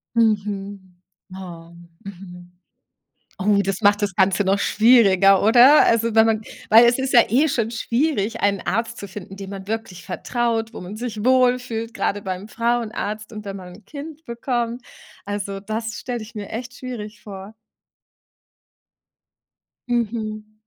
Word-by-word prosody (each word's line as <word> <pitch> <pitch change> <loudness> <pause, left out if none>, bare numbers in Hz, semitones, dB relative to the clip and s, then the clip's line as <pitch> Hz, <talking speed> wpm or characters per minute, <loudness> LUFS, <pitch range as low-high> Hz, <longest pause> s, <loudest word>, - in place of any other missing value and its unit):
Mhm. 200 -4 -1 0.4
Oh, 170 -3 -10 0.3
mhm. 180 -2 -11 0.9
Oh, 200 +1 +3
das 195 -1 -2
macht 205 +1 +4
das 200 -2 -1
Ganze 190 +1 +3
noch 195 +1 +1
schwieriger, 200 -4 +5
oder? 245 +7 +7
Also, 230 0 +2
wenn 220 - +7
man 220 -1 +1 0.3
weil 230 +2 +8
es 240 +2 +3
ist 265 0 -2
ja 240 -3 +8
eh 275 +8 +3
schon 230 -5 -1
schwierig, 230 -2 -1
einen 200 -1 +1
Arzt 230 +4 -2
zu 200 - -6
finden, 195 0 -10
dem 195 -1 -8
man 195 -1 -8
wirklich 215 -5 -5
vertraut, 230 -2 -2
wo - - -7
man 180 +4 -8
sich 220 -2 -5
wohl 255 -1 +4
fühlt, 230 -1 -5
grade 205 - -1
beim 190 +1 -5
Frauenarzt 220 -2 -2
und 215 -1 -8
wenn 195 - -6
man 180 -2 -10
'n 215 - -17
Kind 305 +6 -9
bekommt. 235 0 -3 0.4
Also, 200 -1 -4
das 220 +2 -4
stelle 245 -1 -4
ich 220 +2 -12
mir 205 -2 -6
echt 245 +2 -6
schwierig 215 -5 -8
vor. 195 0 -9 2.4
Mhm. 215 -2 -3
215 Hz, 150 wpm, -22 LUFS, 195-235 Hz, 2.4 s, weil